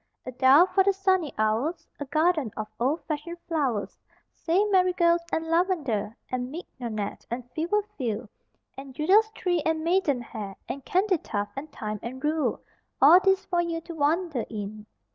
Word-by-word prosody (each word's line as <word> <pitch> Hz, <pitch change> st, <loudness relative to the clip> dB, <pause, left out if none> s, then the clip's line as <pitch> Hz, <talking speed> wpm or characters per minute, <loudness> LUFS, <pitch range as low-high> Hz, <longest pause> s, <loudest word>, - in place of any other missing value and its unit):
A 255 Hz, -, -5 dB
dial 265 Hz, +6 st, +6 dB
for 385 Hz, +1 st, +2 dB
the 395 Hz, +1 st, +3 dB
sunny 375 Hz, -6 st, +1 dB
hours, 255 Hz, +10 st, 0 dB
A 290 Hz, -, -4 dB
garden 310 Hz, -3 st, +1 dB
of 215 Hz, -1 st, -3 dB
old 275 Hz, +7 st, 0 dB
fashioned 320 Hz, +3 st, -4 dB
flowers 275 Hz, -11 st, -1 dB, 0.3 s
Say 360 Hz, +5 st, +1 dB
marigolds 360 Hz, -3 st, +3 dB
and 320 Hz, -, -1 dB
lavender 310 Hz, -, 0 dB
And 250 Hz, 0 st, -2 dB
mignonette 235 Hz, -, -6 dB
and 240 Hz, +1 st, -5 dB
fever 345 Hz, +9 st, 0 dB, 0.2 s
few, 230 Hz, -2 st, -2 dB, 0.5 s
And 270 Hz, -1 st, -10 dB
Judas 390 Hz, +10 st, +4 dB
tree 350 Hz, -3 st, 0 dB
and 320 Hz, 0 st, 0 dB
maidenhair 250 Hz, -, -1 dB
And 275 Hz, -, -5 dB
candytuft 355 Hz, -, 0 dB
and 290 Hz, +3 st, -7 dB
thyme 215 Hz, -1 st, -5 dB
and 260 Hz, +4 st, -7 dB
rue 305 Hz, 0 st, 0 dB, 0.4 s
All 320 Hz, +6 st, +8 dB
these 385 Hz, 0 st, +2 dB
for 350 Hz, -2 st, +1 dB
you 335 Hz, -1 st, -2 dB
to 335 Hz, -, -9 dB
wander 315 Hz, -3 st, 0 dB
in. 210 Hz, 0 st, -6 dB
305 Hz, 155 wpm, -26 LUFS, 245-350 Hz, 0.5 s, All